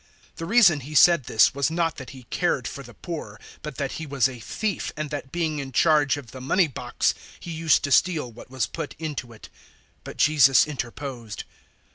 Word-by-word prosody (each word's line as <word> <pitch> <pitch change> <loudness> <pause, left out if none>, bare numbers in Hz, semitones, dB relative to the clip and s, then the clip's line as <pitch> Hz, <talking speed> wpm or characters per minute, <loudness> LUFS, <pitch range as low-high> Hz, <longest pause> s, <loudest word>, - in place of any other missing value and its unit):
012:006 - - -40
The 165 - -5
reason 195 -8 +5
he 145 +3 -9
said 170 -1 +6
this 110 - +4
was 140 +2 0
not 165 -1 -1
that 130 - -8
he 130 -2 -12
cared - - 0
for - - -7
the - - -13
poor, - - -7 0.2
but 150 -3 -7
that 140 -1 -3
he 160 - -6
was 140 -2 +2
a 130 -2 -9
thief, 200 - -3
and 155 -1 -4
that 145 -3 -5
being 160 -3 -1
in 135 -1 -6
charge 150 +1 +3
of 125 -6 -10
the 130 - -9
money 175 +8 +3
box, 125 -3 -1 0.3
he 170 - -8
used 160 -2 +2
to 140 - -2
steal 155 -3 +2
what 115 +2 -13
was 130 -4 -1
put 155 - -6
into 150 -6 -5
it. 110 - -13
012:007 - - -26 0.4
But - - -9
Jesus 140 -3 +5
interposed. 125 -5 -6
145 Hz, 210 wpm, -24 LUFS, 130-160 Hz, 0.4 s, said